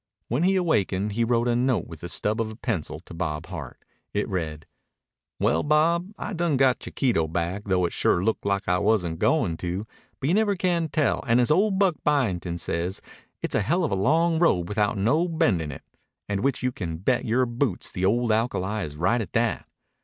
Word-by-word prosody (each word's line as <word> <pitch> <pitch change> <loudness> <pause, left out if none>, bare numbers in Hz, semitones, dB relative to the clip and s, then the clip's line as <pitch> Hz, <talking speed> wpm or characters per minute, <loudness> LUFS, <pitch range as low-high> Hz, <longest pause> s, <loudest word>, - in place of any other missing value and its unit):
When 125 +6 0
he 190 +2 +3
awakened 105 - +1
he 115 +3 0
wrote 120 +1 +1
a 120 - +2
note 125 0 +1
with 80 -2 -10
the 85 - -5
stub 105 +4 0
of 110 - -2
a 110 - -8
pencil 80 -9 -3
to 85 - -13
Bob 80 -2 -3
Hart. 85 -8 -7 0.4
It 105 - 0
read: 80 -6 -4 0.7
Well, - - +2
Bob, 165 +5 +2
I - - -5
done 170 -5 +1
got 130 -1 +3
Chiquito 115 - 0
back 85 +5 -3
though 95 -3 +2
it 85 - -3
sure 85 - +2
looked 110 +2 0
like 100 0 -1
I 90 0 +2
wasn't 95 -6 +1
going 115 - +2
to 90 +5 -3 0.3
but 135 - -2
you 165 - +2
never 205 0 +2
can 175 -3 0
tell 155 0 +1
and 115 +1 +4
as 125 +3 +3
old 195 +4 +3
Buck 190 -4 +2
Byington 95 -12 0
says 85 +2 -3 0.4
its - - -2
a - - +2
hell 175 - +1
of 160 - 0
a - - +2
long 160 - +2
road 90 - +3
without 105 0 0
no 140 - +2
bend 160 - +1
in 75 -2 -4
it 70 - -9 0.4
and 100 -1 -1
which 130 +2 0
you 125 - +1
can 85 -8 -5
bet 120 +8 0
your 125 +3 +2
boots 120 -4 -2
the 90 - -4
old 115 +4 +2
alkali 110 -2 0
is 75 -3 -6
right 110 +9 +2
at 110 - -7
that. 115 -1 0
110 Hz, 215 wpm, -25 LUFS, 90-145 Hz, 0.7 s, and